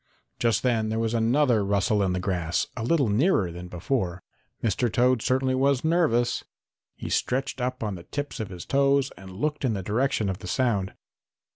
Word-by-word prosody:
Just 115 Hz, -1 st, +1 dB
then 115 Hz, -4 st, +1 dB
there 110 Hz, -, -1 dB
was 115 Hz, 0 st, 0 dB
another 120 Hz, 0 st, +3 dB
rustle 100 Hz, +2 st, +1 dB
in 95 Hz, -2 st, +1 dB
the 90 Hz, -, -1 dB
grass, 90 Hz, -3 st, -1 dB
a 115 Hz, -, -4 dB
little 140 Hz, +1 st, +2 dB
nearer 105 Hz, -, +2 dB
than 90 Hz, +1 st, -8 dB
before. 90 Hz, 0 st, -2 dB, 0.4 s
Mr. 115 Hz, +2 st, +1 dB
Toad 125 Hz, +1 st, +3 dB
certainly 130 Hz, +1 st, +1 dB
was 135 Hz, 0 st, +2 dB
nervous. 155 Hz, -8 st, +2 dB, 0.5 s
He -, -, -7 dB
stretched 135 Hz, +1 st, -1 dB
up 125 Hz, -1 st, -2 dB
on 105 Hz, -2 st, -2 dB
the 90 Hz, -, -7 dB
tips 145 Hz, +10 st, -5 dB
of 110 Hz, -3 st, -4 dB
his 90 Hz, -2 st, -8 dB
toes 140 Hz, 0 st, +2 dB
and 95 Hz, +1 st, -12 dB
looked 150 Hz, +11 st, -2 dB
in 125 Hz, -4 st, +1 dB
the 95 Hz, -2 st, -3 dB
direction 110 Hz, +1 st, 0 dB
of 95 Hz, -1 st, -3 dB
the -, -, -8 dB
sound. 100 Hz, -3 st, 0 dB
115 Hz, 185 wpm, -26 LUFS, 95-130 Hz, 0.5 s, another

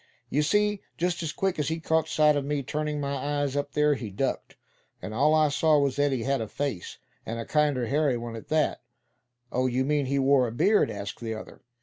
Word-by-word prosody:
"You 150 Hz, -, +2 dB
see, 210 Hz, +6 st, +1 dB, 0.2 s
just 175 Hz, 0 st, -1 dB
as 160 Hz, -2 st, -2 dB
quick 190 Hz, 0 st, -1 dB
as 145 Hz, -, 0 dB
he 160 Hz, +2 st, -1 dB
caught 160 Hz, 0 st, +1 dB
sight 150 Hz, -1 st, +4 dB
of 145 Hz, -, 0 dB
me 145 Hz, 0 st, -2 dB
turning 150 Hz, +2 st, -2 dB
my 140 Hz, 0 st, -2 dB
eyes 145 Hz, -1 st, -1 dB
up 145 Hz, -1 st, -2 dB
there, 150 Hz, 0 st, +3 dB
he 120 Hz, -6 st, -5 dB
ducked. 95 Hz, -, -3 dB, 0.4 s
And 110 Hz, -, -7 dB
all 150 Hz, +7 st, +3 dB
I 155 Hz, -1 st, +4 dB
saw 155 Hz, +1 st, +3 dB
was 140 Hz, -2 st, +1 dB
that 145 Hz, 0 st, +2 dB
he 125 Hz, -4 st, -1 dB
had 135 Hz, -1 st, 0 dB
a 110 Hz, -, -3 dB
face, 135 Hz, -7 st, -4 dB, 0.3 s
and 115 Hz, -, -5 dB
a 115 Hz, -, -4 dB
kinder 145 Hz, -5 st, +1 dB
hairy 140 Hz, 0 st, +1 dB
one 115 Hz, -1 st, -6 dB
at 115 Hz, -, -9 dB
that." 155 Hz, -1 st, +1 dB, 0.7 s
"Oh! 130 Hz, +1 st, +1 dB
you 130 Hz, +1 st, 0 dB
mean 145 Hz, -1 st, +1 dB
he 140 Hz, +1 st, 0 dB
wore 135 Hz, -2 st, +4 dB
a -, -, -5 dB
beard?" 205 Hz, -, +3 dB
asked 100 Hz, 0 st, -6 dB
the 115 Hz, -1 st, -4 dB
other. 110 Hz, -, -10 dB
145 Hz, 230 wpm, -27 LUFS, 130-150 Hz, 0.7 s, sight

